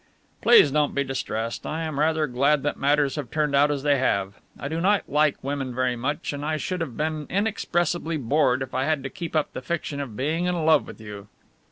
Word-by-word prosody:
"Please 230 Hz, -, +7 dB
don't 150 Hz, 0 st, +1 dB
be 140 Hz, -, +2 dB
distressed, 115 Hz, -4 st, -4 dB
I 160 Hz, +2 st, -3 dB
am 155 Hz, -3 st, -3 dB
rather 155 Hz, 0 st, +2 dB
glad 140 Hz, +2 st, +2 dB
that 145 Hz, -, -1 dB
matters 145 Hz, 0 st, +1 dB
have 140 Hz, -6 st, -4 dB
turned 150 Hz, 0 st, 0 dB
out 145 Hz, +1 st, +5 dB
as 145 Hz, -2 st, -2 dB
they 145 Hz, -2 st, +3 dB
have. 100 Hz, -6 st, 0 dB, 0.3 s
I -, -, -4 dB
do 160 Hz, +3 st, -3 dB
not 200 Hz, +2 st, +2 dB
like 150 Hz, 0 st, +2 dB
women 135 Hz, -2 st, -3 dB
very 130 Hz, -1 st, +1 dB
much, 140 Hz, +5 st, -3 dB
and 145 Hz, 0 st, -5 dB
I 155 Hz, +1 st, -1 dB
should 180 Hz, +4 st, -3 dB
have 135 Hz, -8 st, -4 dB
been 155 Hz, -1 st, -2 dB
inexpressibly 175 Hz, -5 st, 0 dB
bored 135 Hz, -1 st, +2 dB
if 130 Hz, -, -10 dB
I 130 Hz, +1 st, 0 dB
had 155 Hz, -3 st, 0 dB
to 135 Hz, -, -5 dB
keep 170 Hz, -2 st, -6 dB
up 155 Hz, -, 0 dB
the -, -, -5 dB
fiction 145 Hz, 0 st, -3 dB
of 125 Hz, -7 st, -6 dB
being 155 Hz, +6 st, 0 dB
in 175 Hz, -3 st, 0 dB
love 155 Hz, -2 st, +4 dB
with -, -, -10 dB
you." 105 Hz, -2 st, -9 dB
145 Hz, 225 wpm, -25 LUFS, 135-155 Hz, 0.3 s, Please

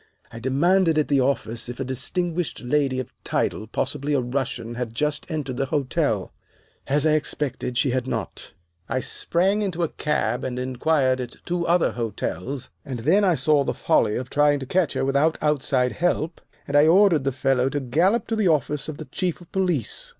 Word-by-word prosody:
"I 115 Hz, -, -8 dB
demanded 165 Hz, +7 st, +2 dB
at 155 Hz, -, +1 dB
the 140 Hz, -2 st, +3 dB
office 120 Hz, -3 st, -1 dB
if 120 Hz, -, -7 dB
a -, -, -1 dB
distinguished 165 Hz, +6 st, -2 dB
lady 135 Hz, 0 st, +1 dB
of 130 Hz, -, -6 dB
title, 110 Hz, -, -1 dB
possibly 140 Hz, +5 st, -2 dB
a -, -, +3 dB
Russian, 125 Hz, -2 st, -3 dB
had 120 Hz, -1 st, -5 dB
just 150 Hz, +4 st, -1 dB
entered 140 Hz, -6 st, -3 dB
the 135 Hz, -, -1 dB
hotel. 140 Hz, -3 st, -1 dB, 0.5 s
"As 145 Hz, +2 st, +2 dB
I 155 Hz, -, +4 dB
expected, 145 Hz, -4 st, -1 dB
she 125 Hz, +1 st, +2 dB
had 130 Hz, 0 st, -1 dB
not. -, -, -5 dB, 0.4 s
I 130 Hz, -, 0 dB
sprang 190 Hz, +9 st, 0 dB
into 180 Hz, -4 st, -1 dB
a 165 Hz, -, 0 dB
cab 125 Hz, -5 st, -1 dB
and 125 Hz, -1 st, -3 dB
inquired 130 Hz, +1 st, +1 dB
at 120 Hz, -1 st, -7 dB
two 175 Hz, -1 st, -1 dB
other 175 Hz, 0 st, +3 dB
hotels, 120 Hz, +2 st, -4 dB
and 130 Hz, -5 st, -5 dB
then 185 Hz, -, +3 dB
I 185 Hz, -4 st, +4 dB
saw 150 Hz, -2 st, +3 dB
the -, -, -2 dB
folly 105 Hz, -2 st, +2 dB
of 125 Hz, 0 st, -4 dB
trying 145 Hz, 0 st, +4 dB
to -, -, -4 dB
catch 175 Hz, +1 st, +1 dB
her -, -, -1 dB
without 140 Hz, +4 st, +2 dB
outside 135 Hz, -4 st, +1 dB
help, 170 Hz, -1 st, -1 dB, 0.3 s
and 140 Hz, -, -2 dB
I 145 Hz, +1 st, +6 dB
ordered 175 Hz, -4 st, +5 dB
the 135 Hz, -, 0 dB
fellow 135 Hz, 0 st, +1 dB
to 145 Hz, -, -2 dB
gallop 170 Hz, -, +2 dB
to 225 Hz, -, 0 dB
the 215 Hz, -3 st, +2 dB
office 150 Hz, -2 st, 0 dB
of 150 Hz, -, -6 dB
the 155 Hz, -, -7 dB
Chief 175 Hz, +5 st, -2 dB
of 175 Hz, -, -16 dB
Police. 180 Hz, -, -1 dB
140 Hz, 195 wpm, -24 LUFS, 130-160 Hz, 0.5 s, I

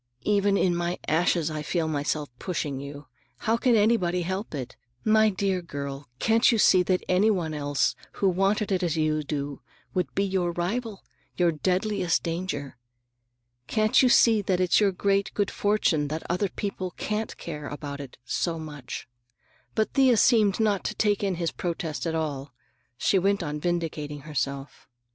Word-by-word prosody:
"Even 200 Hz, -1 st, +2 dB
in 180 Hz, -3 st, +2 dB
my 175 Hz, +1 st, -1 dB
ashes 165 Hz, 0 st, +2 dB
I 155 Hz, -1 st, -3 dB
feel 160 Hz, +1 st, -1 dB
myself 150 Hz, 0 st, -1 dB
pushing 150 Hz, -7 st, -3 dB
you! 140 Hz, +1 st, -8 dB, 0.3 s
How 225 Hz, 0 st, +1 dB
can 240 Hz, 0 st, +3 dB
anybody 200 Hz, -5 st, +2 dB
help 190 Hz, 0 st, -4 dB
it? 125 Hz, -3 st, -6 dB, 0.3 s
My 215 Hz, 0 st, +5 dB
dear 190 Hz, -2 st, -1 dB
girl, 140 Hz, -4 st, -6 dB
can't 225 Hz, -, +4 dB
you 230 Hz, -, +2 dB
see 185 Hz, -3 st, +5 dB
that 180 Hz, 0 st, 0 dB
anybody 180 Hz, -5 st, +2 dB
else 145 Hz, -1 st, +1 dB, 0.2 s
who 200 Hz, -, +1 dB
wanted 195 Hz, +3 st, +1 dB
it 190 Hz, -1 st, +1 dB
as 170 Hz, -3 st, 0 dB
you 155 Hz, -1 st, +1 dB
do 145 Hz, -1 st, -4 dB, 0.3 s
would 180 Hz, -2 st, -2 dB
be 195 Hz, -, +2 dB
your 185 Hz, -3 st, 0 dB
rival, 205 Hz, +5 st, -3 dB, 0.3 s
your 175 Hz, -1 st, +3 dB
deadliest 185 Hz, +3 st, 0 dB
danger? 165 Hz, -6 st, -4 dB, 0.9 s
Can't 215 Hz, -1 st, +3 dB
you 255 Hz, -, +5 dB
see 230 Hz, -2 st, +5 dB
that 185 Hz, -2 st, 0 dB
it's 185 Hz, -1 st, +4 dB
your 205 Hz, -2 st, +3 dB
great 200 Hz, +1 st, 0 dB
good 205 Hz, -1 st, 0 dB
fortune 205 Hz, -8 st, +1 dB
that 155 Hz, +2 st, -4 dB
other 180 Hz, +3 st, 0 dB
people 190 Hz, -1 st, -4 dB
can't 215 Hz, +1 st, -3 dB
care 150 Hz, -3 st, -6 dB
about 145 Hz, -1 st, -6 dB
it 135 Hz, -3 st, -10 dB
so 165 Hz, +6 st, -1 dB
much?" 150 Hz, -5 st, -7 dB, 0.7 s
But 220 Hz, -1 st, 0 dB
Thea 260 Hz, -4 st, +5 dB
seemed 215 Hz, -4 st, +4 dB
not 210 Hz, -3 st, +1 dB
to -, -, -2 dB
take 205 Hz, -1 st, +1 dB
in 195 Hz, -2 st, 0 dB
his 170 Hz, -1 st, -1 dB
protest 170 Hz, -2 st, -3 dB
at 165 Hz, -, -1 dB
all. 140 Hz, -4 st, -3 dB, 0.4 s
She 190 Hz, -, +2 dB
went 195 Hz, 0 st, +1 dB
on 150 Hz, -1 st, -3 dB
vindicating 155 Hz, -3 st, -2 dB
herself. 140 Hz, -1 st, -4 dB
180 Hz, 165 wpm, -26 LUFS, 150-200 Hz, 0.9 s, My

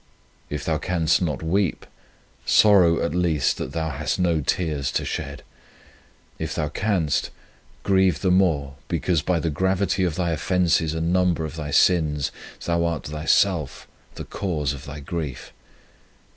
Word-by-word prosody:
If 75 Hz, -2 st, -4 dB
thou 80 Hz, -2 st, 0 dB
canst 85 Hz, -2 st, +1 dB
not 80 Hz, -4 st, -2 dB
weep, 95 Hz, +2 st, 0 dB, 0.6 s
sorrow 95 Hz, -6 st, +5 dB
at -, -, -2 dB
least 85 Hz, -4 st, +1 dB
that 65 Hz, -, -4 dB
thou 80 Hz, 0 st, -2 dB
hast 75 Hz, +3 st, -2 dB
no 85 Hz, -4 st, +1 dB
tears 75 Hz, -3 st, -1 dB
to -, -, -1 dB
shed; -, -, -5 dB, 1.0 s
if -, -, -3 dB
thou 75 Hz, -, -1 dB
canst, 90 Hz, -3 st, 0 dB, 0.5 s
grieve 95 Hz, -5 st, +2 dB
the 95 Hz, -, +2 dB
more 75 Hz, -7 st, +1 dB
because 85 Hz, -1 st, 0 dB
by 90 Hz, +2 st, 0 dB
the 80 Hz, 0 st, -1 dB
gravity 95 Hz, +3 st, 0 dB
of 85 Hz, -4 st, 0 dB
thy 85 Hz, -1 st, -1 dB
offences 80 Hz, -1 st, +1 dB
and 80 Hz, +2 st, 0 dB
number 90 Hz, -3 st, +2 dB
of 80 Hz, -, -7 dB
thy 75 Hz, -2 st, -5 dB
sins 75 Hz, -2 st, +2 dB, 0.3 s
thou 85 Hz, 0 st, +1 dB
art 85 Hz, -3 st, -1 dB
thyself 75 Hz, +1 st, 0 dB, 0.3 s
the -, -, -7 dB
cause 75 Hz, -8 st, -2 dB
of 70 Hz, +1 st, -9 dB
thy 75 Hz, +1 st, -8 dB
grief. 75 Hz, -3 st, -5 dB
80 Hz, 150 wpm, -23 LUFS, 75-90 Hz, 1.0 s, sorrow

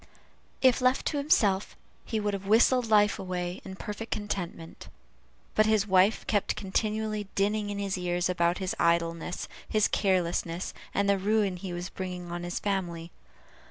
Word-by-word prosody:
If 255 Hz, 0 st, +5 dB
left 255 Hz, +1 st, +2 dB
to 295 Hz, -, 0 dB
himself, 210 Hz, -9 st, +2 dB, 0.3 s
he 220 Hz, -, -2 dB
would 205 Hz, -1 st, -1 dB
have 195 Hz, 0 st, -5 dB
whistled 235 Hz, +2 st, +4 dB
life 210 Hz, -1 st, +4 dB
away, 180 Hz, 0 st, -4 dB
in 190 Hz, -1 st, -8 dB
perfect 210 Hz, +3 st, -6 dB
contentment; 175 Hz, -5 st, -5 dB, 0.7 s
but 215 Hz, 0 st, +4 dB
his 215 Hz, -2 st, +3 dB
wife 190 Hz, +2 st, +3 dB
kept 205 Hz, -3 st, 0 dB
continually 215 Hz, +1 st, -2 dB
dinning 205 Hz, +1 st, +1 dB
in 205 Hz, -, -3 dB
his 195 Hz, -2 st, -2 dB
ears 175 Hz, 0 st, 0 dB
about 170 Hz, -1 st, +1 dB
his 190 Hz, -1 st, -2 dB
idleness, 170 Hz, 0 st, 0 dB, 0.2 s
his 215 Hz, -1 st, +3 dB
carelessness, 175 Hz, -2 st, 0 dB, 0.2 s
and 200 Hz, 0 st, +1 dB
the 200 Hz, -1 st, +3 dB
ruin 205 Hz, -1 st, +1 dB
he 180 Hz, +1 st, -6 dB
was 175 Hz, +1 st, -4 dB
bringing 180 Hz, -2 st, -6 dB
on 175 Hz, 0 st, -4 dB
his 175 Hz, 0 st, -4 dB
family. 175 Hz, -4 st, -3 dB
195 Hz, 160 wpm, -28 LUFS, 180-210 Hz, 0.7 s, If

